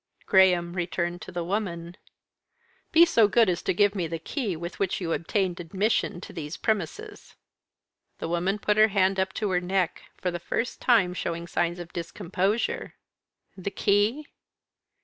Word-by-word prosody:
Graham 180 -3 +4
returned 175 0 -2
to - - -8
the 175 -1 -3
woman. 175 -3 -3 1.0
"Be 335 +1 +8
so 230 -11 +4
good 225 +2 +4
as 175 -1 0
to - - 0
give 205 +2 +3
me 180 -5 -2
the 165 +1 -3
key 200 - -3
with 170 +2 -7
which 195 -2 0
you 165 -3 -1
obtained 185 +1 -1
admission 190 +2 0
to - - -10
these 155 -3 -6
premises." 210 -8 -3 0.8
The - - -4
woman 175 +4 0
put 210 0 0
her 215 0 +7
hand 195 -2 +2
up 190 0 0
to 210 -3 -1
her 180 -1 +2
neck, 185 -1 -1 0.2
for 180 - -2
the 175 - -4
first 230 +7 -3
time 210 -8 +4
showing 170 -1 -3
signs 175 0 -1
of 175 -1 -9
discomposure. 195 - -2 0.6
"The 190 +1 -4
key?" 205 +8 +1
185 Hz, 165 wpm, -26 LUFS, 170-205 Hz, 1.0 s, Be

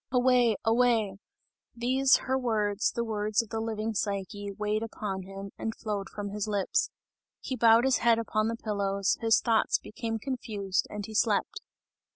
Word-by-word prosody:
"Away! 250 -3 +4
Away!" 225 -4 +2 0.6
These, 260 +3 +3
her 260 - +1
words, 220 -5 0
the 235 - -2
words 215 0 0
of 225 - -15
the 225 - -3
living 220 0 -2
Psyche, 200 0 -3
weighed 210 +1 -1
upon 210 -4 -4
him, 195 +1 -8
and 220 - -3
flowed 205 -3 -4
from 205 -1 -5
his 210 +1 -3
lips. 205 -2 0 0.5
He 260 - -4
bowed 230 0 +5
his 265 -1 +3
head 235 -1 +4
upon 215 -1 0
the 230 - -1
pillows, 200 -3 0
his 225 -1 +4
thoughts 225 -2 +2
became 225 +1 -5
confused 215 -6 -2
and 210 -1 -5
he 220 - -9
slept. 215 - +1
220 Hz, 165 wpm, -29 LUFS, 205-230 Hz, 0.6 s, bowed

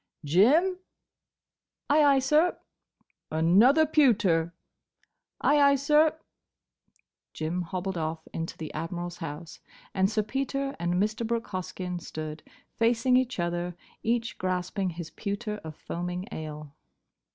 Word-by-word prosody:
—Jim!" 290 - +4 1.1
"Ay, 300 +1 +5
ay, 280 -1 +5
sir!" 300 +6 +3 0.7
"Another 200 - +5
pewter." 210 - +3 0.9
"Ay, 290 0 +4
ay, 280 0 +6
sir." 300 +3 +3 1.2
Jim 160 +3 -2
hobbled 185 +1 -3
off 160 0 -4
into 165 0 -4
the 155 -2 -7
Admiral's 175 +2 -4
house 165 0 -7 0.3
and 190 0 +2
Sir 215 0 0
Peter 275 +4 -2
and 175 +1 0
Mr. 210 +4 0
Brooke 230 0 -2
Hoskyn 185 -1 -4
stood, 155 -1 -6 0.4
facing 230 +2 +3
each 255 -4 +1
other, 175 0 -2 0.3
each 230 0 -1
grasping 185 +1 -1
his 170 -2 -7
pewter 210 +1 -4
of 160 -1 -8
foaming 180 +3 -5
ale. 150 -2 -7
190 Hz, 120 wpm, -28 LUFS, 170-255 Hz, 1.2 s, ay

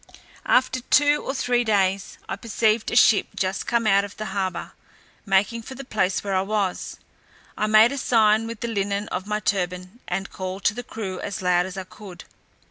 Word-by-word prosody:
After 255 0 +3
two 290 +3 +3
or 270 - -3
three 245 -2 +1
days, 195 -3 0
I - - -3
perceived 220 -1 0
a - - -3
ship 225 -3 +5
just 190 0 -2
come 235 -1 +1
out 200 -1 +4
of 205 0 -9
the 215 - -4
harbour, 190 -2 -3 0.6
making 200 +4 +2
for 260 +4 -9
the 275 - -8
place 195 -6 0
where 200 -1 -2
I 185 - +2
was. 200 -2 -2 0.6
I 215 - 0
made 215 +2 +6
a 280 - -3
sign 220 -3 +3
with 230 -1 -7
the 235 - -2
linen 200 -1 -2
of 185 +2 -4
my 210 0 -1
turban, 185 +1 -2
and 195 0 -3
called 185 +1 -6
to - - +3
the 245 - -5
crew 200 -6 -6
as 200 -2 -5
loud 180 0 +2
as 190 0 -9
I 190 - -3
could. 185 -2 -12
205 Hz, 200 wpm, -23 LUFS, 190-230 Hz, 0.6 s, made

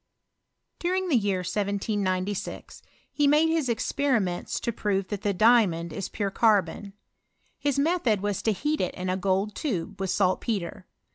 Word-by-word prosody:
During 370 +1 -1
the 295 - +3
year 200 -5 +1
1796 200 0 -2 0.3
he 290 -1 +2
made 305 +3 +4
his 320 -5 0
experiments 230 -6 0
to 235 - -1
prove 195 -3 -1
that 205 -2 -4
the 205 - +1
diamond 185 -6 +3
is 195 - -4
pure 200 -1 -2
carbon. 200 -2 +1 0.7
His 285 -1 0
method 280 - +2
was 205 -1 -2
to 220 - +1
heat 300 +9 -1
it 180 - -2
in 185 0 -2
a - - 0
gold 195 +2 0
tube, 200 - -3
with 190 -1 -2
saltpetre. 185 -1 -1
205 Hz, 150 wpm, -26 LUFS, 190-250 Hz, 0.7 s, made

